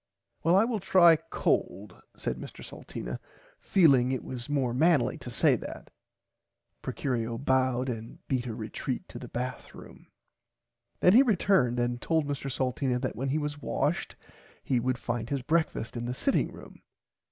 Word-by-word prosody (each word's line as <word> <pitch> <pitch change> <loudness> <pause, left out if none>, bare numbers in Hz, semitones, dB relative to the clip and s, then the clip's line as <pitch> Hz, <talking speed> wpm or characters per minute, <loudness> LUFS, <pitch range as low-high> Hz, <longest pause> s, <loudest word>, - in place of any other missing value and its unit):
Well 170 +3 +4
I 195 - +6
will 230 -3 -1
try 175 -3 +6
cold 100 - -2 0.2
said - - -3
Mr - - -9
Salteena - - -7 0.4
feeling 135 -9 +4
it 130 - -2
was 125 +1 -7
more 135 -5 0
manly 155 0 +3
to - - -8
say - - +4
that. - - -9 0.9
Procurio 115 -3 -2
bowed 130 -1 +1
and 115 -2 -5
beat 130 -2 -1
a 115 - -4
retreat - - -4
to - - -8
the - - -8
bath 125 +1 -5
room. - - -13 0.9
Then 180 - +6
he 245 - +8
returned 190 - +2
and 120 0 -1
told 160 -2 +1
Mr. 140 -1 -3
Salteena 130 0 0
that 130 0 -3
when 135 +3 -2
he 145 - +1
was 145 -1 -3
washed 145 +5 -1 0.5
he 125 - +1
would 130 +1 0
find 120 -1 -3
his 140 -3 -2
breakfast 160 -6 0
in 120 0 -3
the 125 +1 -3
sitting 275 - +1
room. - - -13
130 Hz, 165 wpm, -29 LUFS, 120-155 Hz, 0.9 s, he